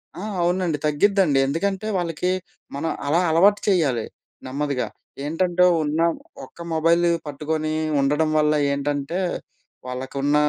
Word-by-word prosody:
ఆ! 180 Hz, -, -7 dB, 0.2 s
అవునండి 175 Hz, -2 st, +1 dB
తగ్గిద్దండి. 150 Hz, -1 st, +3 dB
ఎందుకంటే 195 Hz, +8 st, -1 dB
వాళ్ళకి 175 Hz, +1 st, -1 dB, 0.4 s
మనం 160 Hz, +3 st, -2 dB, 0.2 s
అలా 160 Hz, +4 st, +3 dB
అలవాటు 195 Hz, +6 st, +5 dB
చేయాలి 140 Hz, -, +2 dB, 0.4 s
నెమ్మదిగా. 140 Hz, -1 st, -2 dB, 0.4 s
ఏంటంటే 175 Hz, +3 st, +1 dB, 0.2 s
ఉన్న 150 Hz, +2 st, -1 dB, 0.5 s
ఒక్క 170 Hz, -, -21 dB
మొబైల్‌‌‌ని 170 Hz, +2 st, +3 dB, 0.2 s
పట్టుకొని 155 Hz, +2 st, -2 dB, 0.3 s
ఉండడం 150 Hz, +3 st, +2 dB
వల్ల 150 Hz, 0 st, +3 dB, 0.2 s
ఏంటంటే 145 Hz, +4 st, -2 dB, 0.7 s
వాళ్ళకున్న 135 Hz, +3 st, -2 dB
155 Hz, 110 wpm, -23 LUFS, 145-175 Hz, 0.7 s, అలవాటు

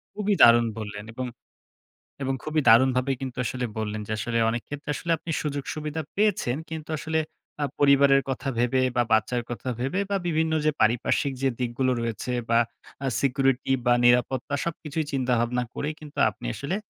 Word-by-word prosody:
খুবই 210 Hz, 0 st, +1 dB
দারুণ 120 Hz, 0 st, +8 dB
বললেন। 105 Hz, -1 st, -6 dB
এবং, 130 Hz, +2 st, -4 dB, 1.0 s
এবং 135 Hz, 0 st, 0 dB
খুবই 155 Hz, 0 st, +1 dB
দারুণভাবে 130 Hz, +3 st, +5 dB
কিন্তু 130 Hz, -2 st, -5 dB
আসলে 125 Hz, +1 st, -2 dB
বললেন। 110 Hz, 0 st, -3 dB
যে 110 Hz, -, -4 dB
আসলে 115 Hz, +2 st, -1 dB
অনেক 115 Hz, 0 st, -3 dB
ক্ষেত্রে 145 Hz, 0 st, -6 dB
আসলে 170 Hz, -, -5 dB
আপনি 165 Hz, -, -7 dB
সুযোগ-সুবিধা 150 Hz, +2 st, -3 dB
পেয়েছেন। 200 Hz, -, +1 dB
কিন্তু 160 Hz, -1 st, -6 dB
আসলে 160 Hz, +1 st, -1 dB, 0.4 s
অ্যা 145 Hz, -, 0 dB
পরিবারের 140 Hz, -1 st, +5 dB
কথা 135 Hz, +1 st, -3 dB
ভেবে 125 Hz, +2 st, +2 dB, 0.2 s
বা 120 Hz, -, +4 dB
বাচ্চার 110 Hz, +3 st, +2 dB
কথা 120 Hz, +2 st, -5 dB
ভেবে 135 Hz, +10 st, -1 dB
বা 200 Hz, -, +2 dB
বিভিন্ন 160 Hz, -1 st, +1 dB
যে 155 Hz, -, +4 dB
পারিপার্শ্বিক 120 Hz, +5 st, +2 dB
যে 135 Hz, -, +3 dB
দিকগুলো 125 Hz, +1 st, 0 dB
রয়েছে 115 Hz, +2 st, -3 dB, 0.2 s
বা 115 Hz, -, +5 dB, 0.5 s
আ -, -, 0 dB
সিকিউরিটি 135 Hz, -1 st, +1 dB
বা 120 Hz, -, +6 dB
নিরাপত্তা 125 Hz, +3 st, +3 dB
সবকিছুই 160 Hz, -2 st, -3 dB
চিন্তাভাবনা 125 Hz, -2 st, +1 dB
করেই 150 Hz, +1 st, -3 dB
কিন্তু 150 Hz, -2 st, -11 dB
আপনি -, -, -9 dB
আসলে 175 Hz, +8 st, -3 dB
135 Hz, 165 wpm, -26 LUFS, 120-150 Hz, 1.0 s, দারুণ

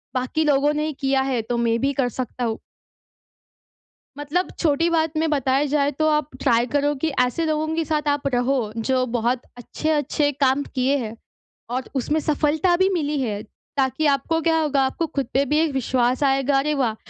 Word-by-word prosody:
बाकी 255 Hz, +5 st, 0 dB
लोगों 290 Hz, 0 st, +3 dB
ने 300 Hz, 0 st, -1 dB
ही 310 Hz, -, -3 dB
किया 270 Hz, -1 st, +1 dB
है, 265 Hz, -3 st, 0 dB
तो 235 Hz, +2 st, -3 dB
मैं 230 Hz, -1 st, +1 dB
भी 275 Hz, +1 st, +1 dB
कर 265 Hz, -2 st, 0 dB
सकता 250 Hz, +1 st, -5 dB
हूँ। 225 Hz, -1 st, -2 dB, 1.6 s
मतलब 300 Hz, +6 st, -1 dB
छोटी 330 Hz, +1 st, +2 dB
बात 320 Hz, -1 st, 0 dB
में 320 Hz, +1 st, +1 dB
बताया 275 Hz, -1 st, +1 dB
जाए, 285 Hz, 0 st, +1 dB
तो 310 Hz, +2 st, -1 dB
आप 300 Hz, -1 st, +1 dB
ट्राई 240 Hz, -3 st, +3 dB
करो 290 Hz, 0 st, +2 dB
कि 290 Hz, +3 st, -2 dB
ऐसे 250 Hz, +6 st, +1 dB
लोगों 310 Hz, 0 st, 0 dB
के 330 Hz, -, 0 dB
साथ 300 Hz, -1 st, -1 dB
आप 285 Hz, -1 st, 0 dB
रहो, 245 Hz, -3 st, 0 dB
जो 255 Hz, +3 st, +1 dB
बहुत 240 Hz, +1 st, +1 dB, 0.2 s
अच्छे-अच्छे 295 Hz, +3 st, -1 dB
काम 275 Hz, 0 st, +2 dB
किए 260 Hz, +2 st, +2 dB
हैं 230 Hz, -4 st, -4 dB, 0.6 s
और 255 Hz, +1 st, -3 dB
उसमें 295 Hz, +4 st, 0 dB
सफलता 305 Hz, +3 st, +1 dB
भी 375 Hz, +1 st, +3 dB
मिली 300 Hz, -4 st, -1 dB
है। 210 Hz, -5 st, -2 dB, 0.4 s
ताकि 270 Hz, +3 st, +1 dB
आपको 285 Hz, +3 st, +1 dB
क्या 325 Hz, 0 st, +2 dB
होगा, 290 Hz, -3 st, +1 dB
आपको 330 Hz, +5 st, -1 dB
खुद 280 Hz, -4 st, -2 dB
पे 270 Hz, -, +3 dB
भी 295 Hz, +3 st, +1 dB
एक 320 Hz, -1 st, +2 dB
विश्वास 255 Hz, 0 st, +1 dB
आएगा। 270 Hz, 0 st, +2 dB
अरे 300 Hz, +2 st, 0 dB
वाह! 250 Hz, -6 st, 0 dB
280 Hz, 190 wpm, -22 LUFS, 255-305 Hz, 1.6 s, लोगों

